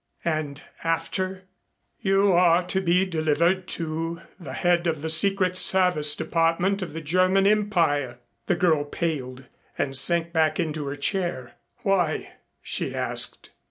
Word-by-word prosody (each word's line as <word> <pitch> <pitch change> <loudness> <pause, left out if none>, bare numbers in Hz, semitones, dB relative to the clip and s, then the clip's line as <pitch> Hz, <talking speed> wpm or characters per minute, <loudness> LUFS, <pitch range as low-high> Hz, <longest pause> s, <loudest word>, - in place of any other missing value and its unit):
"And 155 -3 -3 0.2
after 185 +3 -2 0.3
" - - -50
"You 195 +1 +2
are 175 0 +4
to 190 +2 -2
be 180 +1 +2
delivered 170 +2 0
to 165 +1 -4 0.2
the 140 -7 -8
head 175 +2 +1
of 155 -3 -2
the 160 - -2
Secret 185 +2 +3
Service 180 -6 +3
Department 170 +4 0
of 180 - -6
the 165 - -6
German 185 +5 +2
Empire." 170 - +1 0.3
The - - +2
girl 165 -4 +2
paled 135 -4 -4 0.3
and 135 -1 -2
sank 170 +4 +2
back 155 -1 +1
into 155 -3 -3
her 140 - -4
chair. 145 -4 -2 0.3
"Why?" 185 -7 0 0.3
she - - -3
asked. - - +1
170 Hz, 140 wpm, -24 LUFS, 155-185 Hz, 0.3 s, are